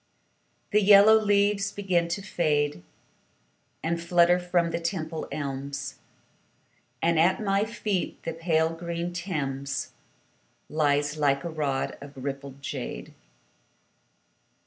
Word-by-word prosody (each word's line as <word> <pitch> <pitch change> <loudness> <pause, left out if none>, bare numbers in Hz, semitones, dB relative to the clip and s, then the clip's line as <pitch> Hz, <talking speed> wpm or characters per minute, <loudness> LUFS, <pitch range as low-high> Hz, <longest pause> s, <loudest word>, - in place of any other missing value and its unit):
The 210 - +4
yellow 205 +2 +8
leaves 205 -1 +3
begin 185 -4 0
to 175 +4 -3
fade 150 - 0 1.0
And 170 +1 -1
flutter 175 +1 +4
from 175 -1 +1
the 170 - -1
Temple 165 -2 -3
elms, 140 -1 -5 1.0
And 165 -1 +3
at 175 +4 +4
my 200 -1 +1
feet 210 -5 -2
the 165 - -3
pale 160 -1 +1
green 170 +1 -4
Thames 140 -6 -3 0.8
Lies 145 -1 +1
like 140 -2 +2
a 170 - -4
rod 145 -4 -2
of 140 0 -10
rippled 140 0 -6
jade. - - -5
170 Hz, 110 wpm, -27 LUFS, 145-185 Hz, 1.0 s, yellow